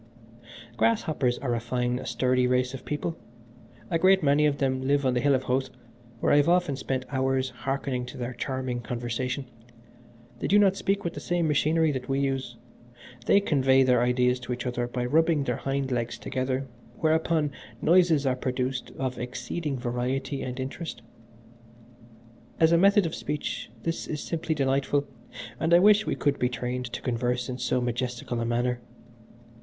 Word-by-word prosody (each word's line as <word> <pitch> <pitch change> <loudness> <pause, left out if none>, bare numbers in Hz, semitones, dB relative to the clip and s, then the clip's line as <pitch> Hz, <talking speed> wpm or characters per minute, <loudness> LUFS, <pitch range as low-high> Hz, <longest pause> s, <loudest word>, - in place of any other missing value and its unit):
"Grasshoppers 155 - +1
are 125 -3 0
a 120 - 0
fine, 125 +1 -2
sturdy 125 -1 +1
race 125 +1 +1
of 135 - -8
people. 150 +3 -3 0.8
A 165 - +2
great 190 +1 +5
many 145 +1 +4
of 145 -1 0
them 130 -1 0
live 140 0 +2
on 130 - +3
the 125 - +1
Hill 140 +1 +3
of 130 - -1
Howth, 130 +1 0 0.5
where - - +2
I - - +6
have 145 +3 +4
often 175 -5 +2
spent 130 -1 -3
hours 130 -1 0
hearkening 130 0 -3
to - - -9
their 125 0 -4
charming 130 0 -3
conversation. 125 +3 -3 0.9
They - - -2
do 205 - +5
not 195 -2 +5
speak 195 0 -1
with 170 - -3
the - - -6
same 175 -2 0
machinery 155 +2 +2
that 130 -2 -5
we 135 0 +1
use 135 -3 -2 0.7
they 200 - +6
convey 135 -7 +3
their 125 -2 +3
ideas 125 +1 +2
to 125 0 -4
each 125 +1 -5
other 120 -1 -1
by 120 0 -3
rubbing 160 +2 +3
their - - -1
hind 135 -1 -2
legs 120 -1 -2
together, 130 +1 -2 0.3
whereupon 160 -1 +2 0.3
noises 170 -4 +4
are 130 -1 +2
produced 130 0 -2
of 130 -2 -3
exceeding 125 +4 -4
variety 130 +3 -2
and 130 0 -5
interest. 135 +1 -5 1.6
As 160 0 +5
a - - +6
method 200 +1 +5
of 165 - -3
speech 150 0 -4
this 165 0 -3
is 150 - -3
simply 160 +1 -2
delightful, 140 +1 +1 0.5
and 165 +1 +4
I - - +9
wish 210 +3 +5
we - - 0
could 145 -1 0
be 125 - +2
trained 125 +1 -3
to 120 - -7
converse 125 0 -1
in 125 0 -4
so 125 +1 +1
majestical 120 0 -2
a 115 - -1
manner. 120 +1 0
130 Hz, 175 wpm, -27 LUFS, 125-150 Hz, 1.6 s, I